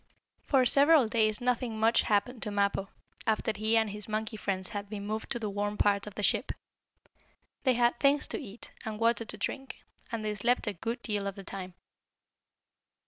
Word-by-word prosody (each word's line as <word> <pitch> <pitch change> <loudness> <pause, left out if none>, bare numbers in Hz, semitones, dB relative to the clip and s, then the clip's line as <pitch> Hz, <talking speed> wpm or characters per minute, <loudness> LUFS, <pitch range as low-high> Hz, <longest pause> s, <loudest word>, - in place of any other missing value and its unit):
For 265 -3 +4
several 285 +1 +6
days 215 -2 +2
nothing 245 -2 -1
much 225 +2 +4
happened 215 +3 0
to - - -2
Mappo, 200 -1 0 0.4
after 220 0 +1
he 215 +2 +2
and 220 -2 +2
his 210 +1 -7
monkey 215 +1 -2
friends 190 -3 -2
had 205 -2 -5
been 205 -1 -5
moved 215 +1 -3
to - - -1
the 225 -2 -3
warm 205 +1 -2
part 200 0 +2
of 210 - -8
the 210 - -4
ship. - - +1 1.1
They 255 -2 +4
had 240 0 +2
things 285 +1 +4
to - - -2
eat, 225 -3 -9
and 215 -1 -5
water 230 0 +2
to 210 - -5
drink, 270 +6 -5 0.3
and 225 -2 -3
they 210 - 0
slept 240 +4 +1
a 210 - -1
good 230 +7 -4
deal 205 -3 -1
of 195 - -4
the 195 - -9
time. 185 -2 -7
215 Hz, 195 wpm, -30 LUFS, 205-235 Hz, 1.1 s, several